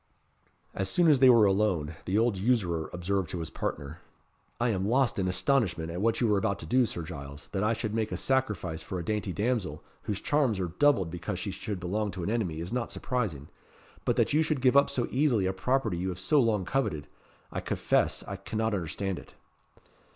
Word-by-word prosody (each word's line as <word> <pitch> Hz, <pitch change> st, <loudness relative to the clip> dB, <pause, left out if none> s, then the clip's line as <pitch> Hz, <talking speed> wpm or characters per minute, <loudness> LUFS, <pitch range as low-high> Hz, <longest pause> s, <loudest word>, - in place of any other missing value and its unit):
As 95 Hz, -1 st, -1 dB
soon 175 Hz, -, +3 dB
as 145 Hz, -4 st, +5 dB
they 130 Hz, -1 st, +7 dB
were 115 Hz, -4 st, +7 dB
alone, 95 Hz, -6 st, +1 dB
the 95 Hz, +2 st, 0 dB
old 115 Hz, -1 st, +3 dB
usurer 95 Hz, -6 st, 0 dB
observed 90 Hz, 0 st, -1 dB
to -, -, -4 dB
his 80 Hz, -, -5 dB
partner 70 Hz, +3 st, -4 dB, 0.6 s
"I 120 Hz, 0 st, +2 dB
am 95 Hz, -3 st, 0 dB
lost 125 Hz, -1 st, +2 dB
in 95 Hz, -, +1 dB
astonishment 90 Hz, -, +1 dB
at 90 Hz, +2 st, -4 dB
what 115 Hz, +1 st, +2 dB
you 115 Hz, -4 st, +3 dB
are 100 Hz, -, +3 dB
about 100 Hz, -1 st, 0 dB
to -, -, -7 dB
do, 125 Hz, +8 st, +3 dB
Sir 85 Hz, -, -5 dB
Giles. 70 Hz, -3 st, -8 dB
That 95 Hz, -, -2 dB
I 110 Hz, +2 st, +2 dB
should 110 Hz, -1 st, -3 dB
make 110 Hz, -1 st, -1 dB
a -, -, -2 dB
sacrifice 105 Hz, -11 st, 0 dB
for 95 Hz, -, -5 dB
a 85 Hz, -, -4 dB
dainty 105 Hz, -1 st, -1 dB
damsel, 100 Hz, -7 st, -1 dB, 0.2 s
whose 105 Hz, -2 st, -2 dB
charms 135 Hz, -9 st, +1 dB
are 90 Hz, -2 st, -1 dB
doubled 140 Hz, -, +4 dB
because 85 Hz, -1 st, -4 dB
she -, -, -3 dB
should 105 Hz, -4 st, -5 dB
belong 105 Hz, +4 st, -1 dB
to 90 Hz, -1 st, -5 dB
an 100 Hz, -, -1 dB
enemy, 95 Hz, -9 st, -1 dB
is 85 Hz, +7 st, -5 dB
not 125 Hz, -2 st, -2 dB
surprising; 100 Hz, -, -3 dB, 0.5 s
but -, -, +1 dB
that -, -, +2 dB
you 155 Hz, -, +4 dB
should 155 Hz, -3 st, 0 dB
give 130 Hz, +1 st, +4 dB
up 140 Hz, -, +6 dB
so 120 Hz, -, -1 dB
easily 125 Hz, -7 st, +2 dB
a 95 Hz, -, 0 dB
property 115 Hz, -1 st, 0 dB
you 90 Hz, +2 st, -2 dB
have 90 Hz, -, -4 dB
so 150 Hz, +10 st, +2 dB
long 110 Hz, -6 st, +1 dB
coveted 90 Hz, -, -1 dB, 0.5 s
I -, -, -3 dB
confess -, -, 0 dB
I 100 Hz, -, -5 dB
cannot 110 Hz, +3 st, -2 dB
understand 95 Hz, +1 st, -2 dB
it." -, -, -16 dB
100 Hz, 215 wpm, -29 LUFS, 90-120 Hz, 0.6 s, they